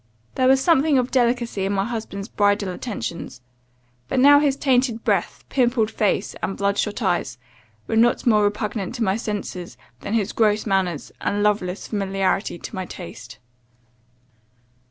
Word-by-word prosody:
There 255 Hz, -, +2 dB
was 265 Hz, 0 st, +5 dB
something 300 Hz, -1 st, +3 dB
of 250 Hz, 0 st, 0 dB
delicacy 240 Hz, -5 st, +1 dB
in 195 Hz, +1 st, 0 dB
my 195 Hz, 0 st, 0 dB
husband's 215 Hz, -4 st, -5 dB
bridal 205 Hz, -3 st, +1 dB
attentions; 180 Hz, -, -5 dB, 0.7 s
but 255 Hz, -, 0 dB
now 285 Hz, +2 st, +7 dB
his 285 Hz, -2 st, +2 dB
tainted 255 Hz, -4 st, +1 dB
breath, -, -, -1 dB
pimpled 240 Hz, -4 st, +1 dB
face, 210 Hz, -2 st, 0 dB
and 195 Hz, -, -3 dB
blood 200 Hz, 0 st, 0 dB
shot 210 Hz, +2 st, -2 dB
eyes, 175 Hz, -9 st, 0 dB, 0.5 s
were -, -, -2 dB
not 235 Hz, +2 st, +3 dB
more 215 Hz, -3 st, +4 dB
repugnant 205 Hz, 0 st, -2 dB
to 235 Hz, -, -1 dB
my 190 Hz, -2 st, +1 dB
senses, 205 Hz, -5 st, -5 dB, 0.2 s
than 205 Hz, -, -3 dB
his 215 Hz, -2 st, 0 dB
gross 215 Hz, -1 st, +2 dB
manners, 190 Hz, -4 st, -1 dB
and 205 Hz, 0 st, 0 dB
loveless 205 Hz, -3 st, 0 dB
familiarity 195 Hz, -2 st, -1 dB
to -, -, -9 dB
my 185 Hz, -1 st, -4 dB
taste. 115 Hz, -, -10 dB
210 Hz, 155 wpm, -22 LUFS, 195-240 Hz, 0.7 s, now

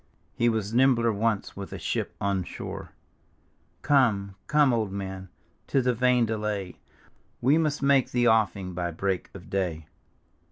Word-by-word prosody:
" -, -, -40 dB
He 120 Hz, -, +2 dB
was 110 Hz, -2 st, -2 dB
nimbler 120 Hz, -2 st, +4 dB
once 105 Hz, 0 st, -1 dB
with 100 Hz, 0 st, -7 dB
a -, -, -5 dB
ship -, -, -3 dB
on 100 Hz, -2 st, 0 dB
shore; -, -, -7 dB, 0.9 s
Come, 110 Hz, -9 st, +2 dB
come, 150 Hz, -4 st, +4 dB
old 110 Hz, -4 st, 0 dB
man, 95 Hz, -1 st, -6 dB, 0.4 s
'tis 135 Hz, -2 st, +1 dB
a 125 Hz, -, +3 dB
vain 125 Hz, 0 st, +3 dB
delay, 105 Hz, -4 st, -3 dB, 0.6 s
We 140 Hz, +6 st, +3 dB
must 150 Hz, -3 st, 0 dB
make 140 Hz, -2 st, +4 dB
the 120 Hz, -1 st, +1 dB
ofEng 105 Hz, -5 st, +2 dB
by 85 Hz, 0 st, -2 dB
break 95 Hz, +2 st, -2 dB
of 90 Hz, -, -11 dB
day." 90 Hz, -5 st, -2 dB
110 Hz, 155 wpm, -27 LUFS, 95-125 Hz, 0.9 s, nimbler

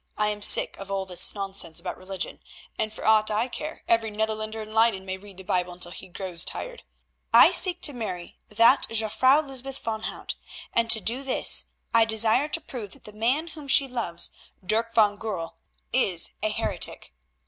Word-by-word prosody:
I 210 Hz, 0 st, +2 dB
am 210 Hz, 0 st, -4 dB
sick -, -, +4 dB
of 195 Hz, 0 st, -8 dB
all 195 Hz, -1 st, -2 dB
this 180 Hz, +2 st, +3 dB
nonsense 195 Hz, -5 st, -2 dB
about 180 Hz, -, -5 dB
religion, 185 Hz, -1 st, -6 dB, 0.4 s
and 215 Hz, 0 st, -2 dB
for -, -, -8 dB
aught 215 Hz, 0 st, +4 dB
I 215 Hz, +3 st, 0 dB
care 305 Hz, +5 st, -6 dB
every 230 Hz, -1 st, +2 dB
Netherlander 220 Hz, +1 st, -3 dB
in 215 Hz, 0 st, -12 dB
Leyden 220 Hz, -4 st, +2 dB
may 190 Hz, 0 st, -4 dB
read 195 Hz, 0 st, -14 dB
the 190 Hz, -, -9 dB
Bible 180 Hz, -1 st, -1 dB
until 175 Hz, 0 st, -2 dB
he -, -, -8 dB
grows 180 Hz, -2 st, -2 dB
tired. -, -, -4 dB, 0.5 s
I -, -, +8 dB
seek 360 Hz, -2 st, +4 dB
to 290 Hz, -, +2 dB
marry 185 Hz, -8 st, -6 dB
that 230 Hz, +5 st, +4 dB
Jufvrouw 255 Hz, +7 st, +2 dB
Lysbeth 270 Hz, 0 st, -5 dB
van 220 Hz, -1 st, -4 dB
Hout, -, -, -5 dB, 0.4 s
and 230 Hz, 0 st, +2 dB
to 225 Hz, -, +7 dB
do 240 Hz, +6 st, 0 dB
this 270 Hz, -2 st, +2 dB, 0.3 s
I 230 Hz, -1 st, +5 dB
desire 220 Hz, +5 st, +2 dB
to 320 Hz, -, -2 dB
prove 225 Hz, -9 st, -8 dB
that -, -, -15 dB
the 210 Hz, -, -10 dB
man 255 Hz, +10 st, 0 dB
whom 305 Hz, -3 st, -11 dB
she 275 Hz, 0 st, +5 dB
loves, 230 Hz, -9 st, -2 dB, 0.3 s
Dirk 225 Hz, +4 st, 0 dB
van 210 Hz, -2 st, +4 dB
Goorl, 190 Hz, -7 st, -5 dB, 0.4 s
is -, -, +2 dB
a -, -, +1 dB
heretic. -, -, -3 dB
220 Hz, 190 wpm, -25 LUFS, 195-235 Hz, 0.5 s, I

